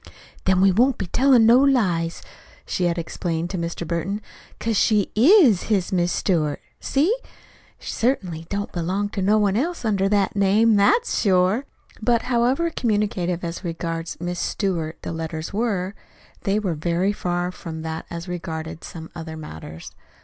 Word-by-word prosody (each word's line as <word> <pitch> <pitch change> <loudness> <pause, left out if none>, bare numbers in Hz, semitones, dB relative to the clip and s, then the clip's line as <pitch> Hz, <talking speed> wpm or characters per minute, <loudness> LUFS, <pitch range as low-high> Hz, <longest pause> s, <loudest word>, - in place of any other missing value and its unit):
"Then 185 -1 +3
we 195 0 +6
won't 245 +7 +3
be 195 - -3
tellin' 250 +4 +4
no 235 +3 +7
lies," 190 -12 +1 0.4
she 180 - -1
had 170 0 0
explained 170 0 -3
to 190 - -3
Mr. 170 0 -4
Burton, 175 +5 -2 0.4
'"cause 225 0 -1
she 210 -1 +2
IS 260 - +6
his 195 -4 +1
'Miss 175 -1 +2
Stewart.' 155 -6 0 0.2
See? 315 - +1 0.6
She - - -7
certainly 180 -10 -1
don't 205 0 -3
belong 185 +4 -1
to 205 - -4
no 205 +3 +3
one 205 -2 +2
else 320 +4 -1
under 195 -3 +1
that 200 -2 +1
name 210 +3 +4
that's 435 - +3
sure!" 190 +5 +2 0.4
But 235 +1 +2
however 250 +7 +1
communicative 205 - -1
as 170 +2 -5
regards 165 -1 -4
"Miss 175 +1 -3
Stewart" 170 -6 -2
the - - -4
letters 160 0 -5
were, 200 -4 -1 0.5
they 200 0 +2
were 200 -5 -1
very 170 +5 0
far 175 -2 -2
from 160 -3 -7
that 160 0 -5
as 170 +1 -6
regarded 165 -3 -5
some 160 -1 -9
other 160 -1 -7
matters. 80 - -9
190 Hz, 160 wpm, -23 LUFS, 170-215 Hz, 0.6 s, no